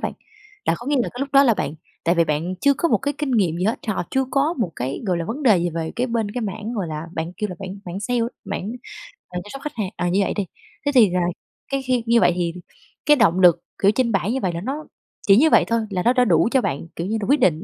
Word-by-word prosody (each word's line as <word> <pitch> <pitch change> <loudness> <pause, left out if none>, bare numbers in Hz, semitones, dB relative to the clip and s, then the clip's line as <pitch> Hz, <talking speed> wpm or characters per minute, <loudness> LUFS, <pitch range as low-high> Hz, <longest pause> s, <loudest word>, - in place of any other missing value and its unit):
bạn, - - -2 0.5
là - - +2
có 240 - -10
nghĩa 290 -1 +1
là 245 - +1
cái 245 - -7
lúc 275 - -1
đó 275 - +7
là 235 - +4
bạn 160 - -3 0.3
tại 170 - +3
vì 170 -1 +3
bạn 160 +4 -1
chưa 280 0 +4
có 335 - 0
một - - +3
cái 285 +1 -2
kinh 295 -2 -2
nghiệm 190 -9 +2
gì 180 - -1
hết, 220 +3 +1
họ 215 - -1
chưa 265 0 +1
có 285 +5 +1
một 180 -8 -1
cái, 130 +3 -3
gọi 180 -2 +1
là, 170 - -2
vấn 250 - -5
đề 215 -9 +5
gì 175 0 0
về 160 0 -4
cái 250 - 0
bên 230 -4 -1
cái 245 +4 -4
mảng 215 +1 -4
gọi 195 -5 -2
là, 155 +1 -5
bạn 165 +2 -4
kêu 210 - -2
là 180 - -6
mảng 195 0 -7
mảng 180 +2 -5
sale, 240 +3 0 0.2
mảng, 210 +5 -4 0.6
ờ, 180 - -5
chăm 205 - -13
sóc 275 - -7
khách 300 0 -5
hàng, 210 -5 -2
à, 175 0 0
như 190 +3 +2
vậy - - -1
đi. 205 -2 -1 0.4
Thế 285 - +2
thì 220 -6 +7
là 180 0 0 0.5
cái 275 - 0
khi 255 -2 0
như 235 0 +4
vậy - - +5
thì 170 -2 -1 0.5
cái 295 - +6
động 190 -7 +3
lực, 175 -2 +5 0.2
kiểu, 200 - +6
trên 235 0 +1
bảng 195 +1 0
như 265 - -1
vậy, 185 - 0
là 170 - -4
nó 285 +7 -4 0.4
chỉ 200 +1 +7
như 315 +5 +5
vậy - - +5
thôi 230 0 +1
là 185 -3 -2
nó 240 - +4
đã 250 -1 +3
đủ 170 0 +3
cho 265 - +3
bạn, 140 0 -3
kiểu 170 +3 -3
như 220 - -1
là, - - -2
quyết 285 +2 +4
định 170 - +2
210 Hz, 295 wpm, -22 LUFS, 175-250 Hz, 0.6 s, đó